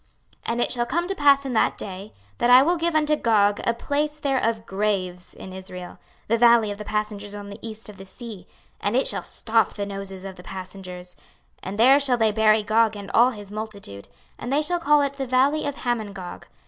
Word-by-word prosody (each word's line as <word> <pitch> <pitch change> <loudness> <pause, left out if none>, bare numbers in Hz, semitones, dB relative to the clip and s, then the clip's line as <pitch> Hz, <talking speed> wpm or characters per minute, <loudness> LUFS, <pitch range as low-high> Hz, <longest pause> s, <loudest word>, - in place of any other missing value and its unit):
26:039:011 - - +1
And 235 +1 -1
it - - +1
shall 240 -1 +1
come 345 +6 0
to 390 - -1
pass 280 -5 +4
in 265 - -3
that 220 - +2
day, 195 +1 -7 0.3
that - - +2
I 250 +2 +9
will 345 +5 +2
give 335 -1 -1
unto 305 -1 +3
Gog 205 -6 +2
a 235 - +1
place 295 +4 -2
there 275 -3 +1
of 225 -1 -1
graves 190 -3 -2
in 185 - -10
Israel, 185 -1 -9 0.3
the 230 +1 +1
valley 235 -3 +5
of 205 - -7
the - - -5
passengers 210 -1 -3
on 205 0 -8
the 200 +2 -9
east 220 -1 -7
of 210 -2 -11
the 195 - -10
sea: 210 -4 -8 0.3
and 205 +3 -1
it 265 - +2
shall - - +1
stop 225 -1 0
the 205 - -3
noses 195 -1 -6
of 190 -1 -8
the - - -10
passengers: 185 -1 -8 0.5
and 195 +2 -6
there 260 +5 +6
shall 265 -3 +2
they 220 -2 +3
bury 215 0 +3
Gog 220 0 +2
and 200 -1 -8
all 240 +2 +5
his 205 -5 -9
multitude: 205 - -7 0.3
and 245 - -5
they 295 +2 +2
shall 350 +3 0
call 295 -2 +4
it 280 -1 -1
The 270 -2 -3
valley 275 +5 +2
of 285 - -3
Hamongog. 210 -8 -4
220 Hz, 225 wpm, -24 LUFS, 200-265 Hz, 0.5 s, I